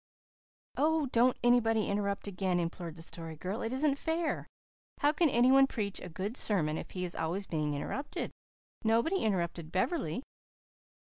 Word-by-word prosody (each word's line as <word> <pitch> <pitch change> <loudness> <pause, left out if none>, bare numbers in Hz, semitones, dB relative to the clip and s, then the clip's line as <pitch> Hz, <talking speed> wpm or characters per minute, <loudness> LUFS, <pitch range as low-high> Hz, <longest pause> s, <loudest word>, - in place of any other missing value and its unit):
"Oh, 315 0 +3
don't 245 +2 +4
anybody 225 -3 +4
interrupt 200 0 -1
again," 185 -2 0
implored 170 -1 -4
the 165 - -6
Story 165 -1 -6
Girl. 185 +7 -4
"It 225 - -2
isn't 280 +1 +1
fair. 325 0 -1 0.5
How 290 - +5
can 325 0 +3
any 245 +1 +4
one 270 0 +7
preach 205 -6 -3
a 180 - -8
good 195 +7 -4
sermon 155 -8 +1
if - - -7
he 180 - -4
is 175 - -2
always 170 +5 -2
being 150 -4 -1
interrupted? 275 - -3 0.5
Nobody 230 - +3
interrupted 170 - -1
Beverley." 225 - 0
205 Hz, 155 wpm, -32 LUFS, 175-260 Hz, 0.5 s, one